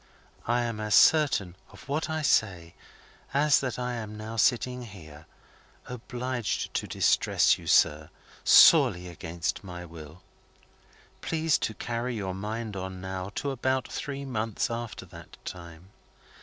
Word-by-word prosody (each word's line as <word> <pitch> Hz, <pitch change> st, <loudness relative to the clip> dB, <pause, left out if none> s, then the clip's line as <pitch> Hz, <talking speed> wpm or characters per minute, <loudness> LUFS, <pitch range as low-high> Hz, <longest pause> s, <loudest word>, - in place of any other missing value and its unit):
I 120 Hz, +1 st, +2 dB
am 115 Hz, -2 st, -4 dB
as 105 Hz, -2 st, +1 dB
certain 130 Hz, -, +4 dB
of -, -, -15 dB
what 150 Hz, +3 st, -2 dB
I 155 Hz, -1 st, -2 dB
say 90 Hz, -, +1 dB, 0.6 s
as 145 Hz, 0 st, +4 dB
that 130 Hz, -3 st, -3 dB
I 125 Hz, 0 st, -3 dB
am 110 Hz, -3 st, -6 dB
now 110 Hz, +1 st, -7 dB
sitting 125 Hz, +2 st, +1 dB
here, 80 Hz, -9 st, -12 dB, 0.6 s
obliged 125 Hz, -1 st, -4 dB
to -, -, -2 dB
distress -, -, +2 dB
you, -, -, -11 dB
sir, 75 Hz, 0 st, +3 dB, 0.3 s
sorely 90 Hz, 0 st, +6 dB
against 85 Hz, +1 st, -4 dB
my 90 Hz, -2 st, -8 dB
will. 80 Hz, 0 st, -12 dB, 1.0 s
Please 160 Hz, -1 st, +1 dB
to 110 Hz, -, -3 dB
carry 120 Hz, +1 st, -3 dB
your 95 Hz, -4 st, -3 dB
mind 105 Hz, +2 st, -5 dB
on, 95 Hz, 0 st, -6 dB
now, 95 Hz, 0 st, -5 dB
to 140 Hz, -, -2 dB
about 130 Hz, 0 st, -1 dB
three 140 Hz, -1 st, -5 dB
months 115 Hz, -1 st, -2 dB
after 115 Hz, -1 st, -5 dB
that -, -, -13 dB
time. 85 Hz, +1 st, -10 dB
110 Hz, 140 wpm, -27 LUFS, 90-125 Hz, 1.0 s, sorely